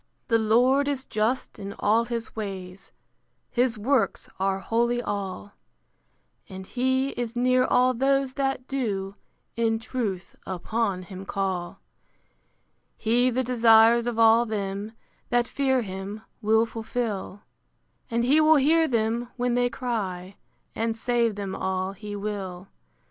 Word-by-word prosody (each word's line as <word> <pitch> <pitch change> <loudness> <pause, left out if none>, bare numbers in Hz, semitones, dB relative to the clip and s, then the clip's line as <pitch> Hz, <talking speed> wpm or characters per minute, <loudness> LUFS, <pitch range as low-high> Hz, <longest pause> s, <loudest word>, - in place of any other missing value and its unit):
The 230 -1 +4
Lord 250 +6 +3
is 275 -2 -2
just 220 +5 -1
in 200 0 -6
all 225 +3 +2
his 235 -1 -5
ways: 195 -3 -7 0.6
His 245 -2 +1
works 225 -1 0
are 190 0 +1
holy 235 +5 0
all: 200 -2 -4 1.0
And 190 -1 -8
he 260 +4 0
is 240 -3 -4
near 255 +1 +3
all 250 0 +3
those 270 +1 +1
that 270 -2 -2
do 200 -8 -2 0.4
In 225 -1 +1
truth 220 -6 -4
upon 190 +1 -2
him 185 +1 -9
call. 190 -3 -3 1.2
He 240 +3 +2
the 255 +1 0
desires 235 -1 +5
of 240 -2 -2
all 230 +1 +5
them 205 0 -3 0.4
That 240 -1 +2
fear 265 -3 +1
him, 195 +2 -6 0.2
will 220 +2 +3
fulfil; 220 -3 -4 0.7
And 235 0 0
he 285 +6 +4
will 310 +1 +6
hear 320 +3 +4
them 235 0 0
when 245 0 0
they 245 0 +2
cry, 200 -7 -4 0.4
And 225 0 -1
save 235 -1 +1
them 195 -2 -4
all 190 0 -2
he 205 +1 -7
will. 200 -3 -5
225 Hz, 130 wpm, -26 LUFS, 200-245 Hz, 1.2 s, will